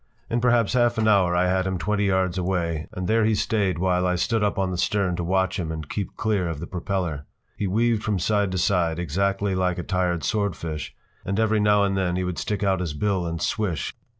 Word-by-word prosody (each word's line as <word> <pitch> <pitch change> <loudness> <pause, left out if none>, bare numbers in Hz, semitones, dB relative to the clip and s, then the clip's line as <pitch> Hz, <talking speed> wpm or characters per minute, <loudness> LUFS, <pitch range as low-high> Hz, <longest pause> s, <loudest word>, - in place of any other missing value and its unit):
In 120 +1 +1
perhaps 120 -3 +3
half 120 -2 +2
an 110 -1 +2
hour 95 -5 +4
I 90 +1 +3
had 95 +1 +1
him 95 -1 -1
twenty 105 +3 0
yards 95 -2 +1
away, 85 -4 -1
and 90 -1 -4
there 110 +1 +3
he 110 0 +3
stayed 100 -4 0
while 90 0 +1
I 90 - +1
stood 110 +4 0
up 105 - 0
on 95 -1 0
the 90 - -3
stern 95 -2 +1
to 90 - -2
watch 95 +2 0
him 80 -3 -3
and 80 -2 -5
keep 100 +2 -4
clear 100 -5 0
of 80 -3 -4
the 85 - -5
propeller. 85 -5 -3 0.3
He 100 - -2
weaved 115 +3 +1
from 105 -2 0
side 100 +2 +1
to - - -1
side, 90 -3 +1
exactly 95 +4 0
like 90 -1 0
a 90 - -3
tired 90 -2 -1
swordfish, 85 - -2 0.3
and 100 +2 -2
every 110 -1 +2
now 105 -1 +4
and 100 -1 +1
then 90 -2 0
he 90 - -1
would 90 -1 -3
stick 105 -1 -2
out 95 -2 +2
his 85 -5 -3
bill 95 +1 0
and 85 0 -3
swish! 90 - -1
95 Hz, 235 wpm, -24 LUFS, 90-105 Hz, 0.3 s, hour